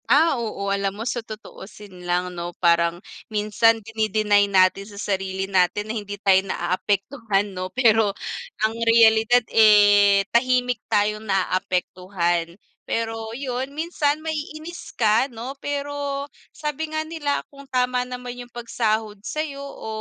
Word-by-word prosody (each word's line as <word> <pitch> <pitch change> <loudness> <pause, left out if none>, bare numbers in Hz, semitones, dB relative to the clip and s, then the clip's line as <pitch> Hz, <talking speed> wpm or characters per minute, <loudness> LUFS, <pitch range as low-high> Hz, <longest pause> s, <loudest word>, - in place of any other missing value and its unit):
Ah, 320 +3 +5
oo 200 -3 -2
alam 200 0 -2
mo 225 - -5
sa 240 0 -2
tutuusin 205 -3 -11
lang 180 +1 0
'no 175 0 -6
parang, 170 -1 +3 0.3
minsan 215 +2 +2
dini-deny 215 -2 +1
natin 190 0 +3
sa 205 - -12
sarili 190 -2 -2
natin 195 +2 +1
na - - -3
hindi 205 -2 -5
tayo 195 -2 +4
na-aapektuhan 200 +3 -1
'no 185 0 -4
pero 225 -3 +3 0.6
ang 220 - 0
realidad, 230 +1 +5
eh, 205 -2 +6
tahimik 250 -1 +2
tayong 210 +1 +1
na-aapektuhan. 180 -2 -1 0.3
Pero 225 -1 -2
yun, 260 0 -3
minsan 305 -1 -1
ma-iinis 315 +1 -6
ka 225 +4 +3
no 240 +4 -7
pero, 285 0 -3 0.2
sabi 305 +1 -4
nga 315 0 -2
nila 310 -3 -1
kung 280 0 -14
tama 250 -1 +1
naman 250 0 -7
yung 245 - -17
pag-sahod 220 -3 -2
sa'yo 285 +1 -4
o 280 -5 -9
220 Hz, 130 wpm, -23 LUFS, 200-255 Hz, 0.6 s, eh